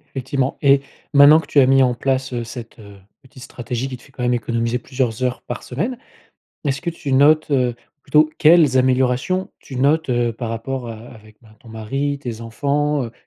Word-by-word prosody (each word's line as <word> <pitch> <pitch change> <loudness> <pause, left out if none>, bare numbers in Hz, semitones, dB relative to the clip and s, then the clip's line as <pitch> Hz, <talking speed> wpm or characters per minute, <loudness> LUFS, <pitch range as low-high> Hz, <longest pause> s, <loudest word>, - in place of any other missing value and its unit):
Effectivement 135 +1 -2
et 140 -1 +4 0.3
maintenant 145 +2 +8
que 160 - -9
tu 145 - +3
as 135 - +6
mis 135 0 +4
en 125 -1 +2
place, 130 +1 -2
heu, 120 -1 -2
cette, 115 0 -10
heu, 100 -2 -13 0.2
petite 130 -1 -15
stratégie 125 0 -5
qui 130 -1 -7
te 125 - -21
fait 135 - -20
quand 130 - -7
même 125 0 +1
économiser 115 +1 -1
plusieurs 125 -1 -3
heures 125 0 -2
par 120 - -7
semaine. 190 - -3 0.7
Est-ce 140 -1 -1
que 175 - -3
tu 160 -4 -5
notes, 150 +4 +4
heu 125 -4 +1 0.3
plutôt 155 0 +3
quelles 155 -4 +5
améliorations 130 +8 +1
tu 130 - -10
notes, 145 +5 +1
heu, 120 -1 +1
par 115 +1 -6
rapport 120 +2 -5
a 115 - -6
avec, 110 -1 -14
ben, 110 -2 -19
ton 120 - -17
mari, 135 +6 -3
tes 120 -5 -7
enfants? 140 +4 -1
Heu, 115 - -8
130 Hz, 205 wpm, -20 LUFS, 120-140 Hz, 0.7 s, maintenant